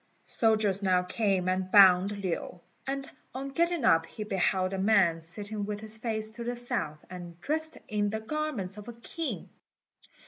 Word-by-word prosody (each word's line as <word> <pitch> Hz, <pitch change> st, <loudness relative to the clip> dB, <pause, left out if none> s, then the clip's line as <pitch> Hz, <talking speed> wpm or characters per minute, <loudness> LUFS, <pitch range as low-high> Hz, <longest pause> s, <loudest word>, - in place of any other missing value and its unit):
Soldiers 215 Hz, -3 st, +2 dB
now 185 Hz, -2 st, +3 dB
came 190 Hz, -1 st, 0 dB
and 185 Hz, 0 st, 0 dB
bound 195 Hz, 0 st, +6 dB
Lin, 180 Hz, 0 st, -3 dB, 0.3 s
and 275 Hz, 0 st, -3 dB, 0.3 s
on 270 Hz, +1 st, -4 dB
getting 340 Hz, -1 st, +1 dB
up 165 Hz, -3 st, +4 dB
he 215 Hz, -, -6 dB
beheld 190 Hz, -1 st, 0 dB
a 190 Hz, -, -2 dB
man 190 Hz, -5 st, +4 dB
sitting 205 Hz, +6 st, -3 dB
with 205 Hz, 0 st, -4 dB
his 220 Hz, 0 st, +1 dB
face 220 Hz, -2 st, -2 dB
to 235 Hz, +1 st, -7 dB
the 240 Hz, +1 st, -2 dB
south, 240 Hz, -, -3 dB
and 175 Hz, -2 st, -9 dB
dressed 315 Hz, -, -2 dB
in 205 Hz, -1 st, 0 dB
the 220 Hz, +1 st, -2 dB
garments 220 Hz, -7 st, -3 dB
of 210 Hz, +1 st, -9 dB
a 240 Hz, -, -6 dB
king. 305 Hz, +8 st, -5 dB
210 Hz, 170 wpm, -29 LUFS, 185-235 Hz, 0.3 s, bound